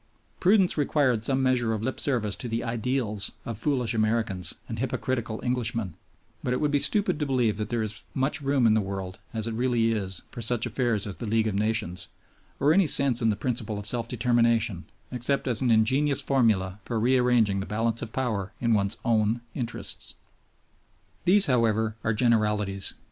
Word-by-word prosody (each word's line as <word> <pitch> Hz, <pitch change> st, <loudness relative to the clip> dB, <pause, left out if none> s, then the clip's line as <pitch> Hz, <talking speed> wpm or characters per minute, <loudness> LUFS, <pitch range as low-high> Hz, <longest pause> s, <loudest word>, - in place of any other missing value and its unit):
Prudence 190 Hz, -3 st, +3 dB
required 135 Hz, -6 st, +1 dB
some 135 Hz, +2 st, +1 dB
measure 125 Hz, -3 st, +1 dB
of 110 Hz, -1 st, -3 dB
lip 130 Hz, -, -3 dB
service 115 Hz, -7 st, -1 dB
to 120 Hz, -, -4 dB
the 115 Hz, +1 st, -2 dB
"ideals" 115 Hz, -3 st, -1 dB
of 115 Hz, -, -4 dB
foolish 125 Hz, 0 st, 0 dB
Americans 110 Hz, -5 st, 0 dB
and 115 Hz, -1 st, -6 dB
hypocritical 120 Hz, -2 st, -2 dB
Englishmen; 115 Hz, -6 st, -1 dB, 0.5 s
but 125 Hz, -, -1 dB
it -, -, -1 dB
would 150 Hz, -1 st, 0 dB
be 145 Hz, -, +2 dB
stupid 190 Hz, -1 st, +2 dB
to 150 Hz, -, 0 dB
believe 125 Hz, -6 st, +1 dB
that 105 Hz, -1 st, -4 dB
there 120 Hz, -2 st, -1 dB
is 110 Hz, 0 st, -3 dB
much 135 Hz, +3 st, -1 dB
room 140 Hz, -3 st, +1 dB
in 110 Hz, -, +5 dB
the 110 Hz, -, +2 dB
world, 95 Hz, -1 st, -6 dB
as 110 Hz, -2 st, -2 dB
it 115 Hz, -, -3 dB
really 120 Hz, -1 st, +1 dB
is, 95 Hz, -5 st, -3 dB
for 120 Hz, -, -7 dB
such 120 Hz, 0 st, +2 dB
affairs 120 Hz, -3 st, 0 dB
as 100 Hz, -3 st, -5 dB
the 115 Hz, -, -5 dB
League 110 Hz, +1 st, +1 dB
of 110 Hz, -, -1 dB
Nations, 105 Hz, -3 st, 0 dB, 0.5 s
or 145 Hz, +3 st, +4 dB
any 195 Hz, -2 st, +4 dB
sense 135 Hz, -4 st, +3 dB
in 115 Hz, -, +2 dB
the 105 Hz, -, +1 dB
principle 115 Hz, -2 st, -2 dB
of 100 Hz, -, -5 dB
self 120 Hz, +1 st, -2 dB
determination 115 Hz, -5 st, +1 dB, 0.3 s
except 130 Hz, +3 st, -1 dB
as 120 Hz, -2 st, 0 dB
an 130 Hz, -, +1 dB
ingenious 130 Hz, +6 st, +3 dB
formula 105 Hz, -8 st, +1 dB
for 115 Hz, -2 st, -3 dB
rearranging 120 Hz, -4 st, +2 dB
the 95 Hz, -, -5 dB
balance 115 Hz, +2 st, -1 dB
of 115 Hz, -, -6 dB
power 110 Hz, -7 st, -2 dB
in 115 Hz, -1 st, +1 dB
one's 100 Hz, -1 st, +1 dB
own 115 Hz, 0 st, +1 dB
interests. 120 Hz, -3 st, -4 dB, 1.1 s
These, 195 Hz, +3 st, +7 dB
however, 110 Hz, -4 st, +1 dB
are 115 Hz, 0 st, 0 dB
generalities. 105 Hz, -4 st, +1 dB
115 Hz, 185 wpm, -26 LUFS, 110-130 Hz, 1.1 s, These